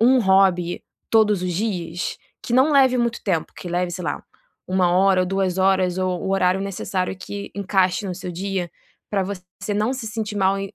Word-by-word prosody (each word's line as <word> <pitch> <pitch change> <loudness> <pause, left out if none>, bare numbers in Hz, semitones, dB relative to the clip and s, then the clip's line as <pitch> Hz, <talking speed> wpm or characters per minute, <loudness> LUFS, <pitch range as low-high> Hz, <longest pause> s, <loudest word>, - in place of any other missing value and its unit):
1, 255 +3 +5
hobby 190 -3 +3 0.3
todos 210 -4 +4
os 180 - -1
dias? 180 -3 -2 0.3
Que - - -5
não 265 +4 +5
leve 265 -2 +5
muito 235 0 0
tempo, 175 -6 -1
que 175 - -7
leve, 175 +1 -1
sei 180 0 -5
lá, - - -3 0.4
1, 185 -1 +2
hora 190 0 +4
ou - - -1
2, 190 -1 0
horas, 190 -1 +2
ou 185 -1 -1
o 190 - -2
horário 185 0 +2
necessário 190 -1 -3
que 200 +2 -7
encaixe 195 0 +1
no 185 - -3
seu 180 0 -6
dia, 185 0 -3 0.4
pra 200 -2 +1
você 185 +1 -6
não 215 +5 +1
se 255 -4 -5
sentir 215 -1 -4
mal 195 0 +2
e 195 0 -6
190 Hz, 195 wpm, -22 LUFS, 180-205 Hz, 0.4 s, 1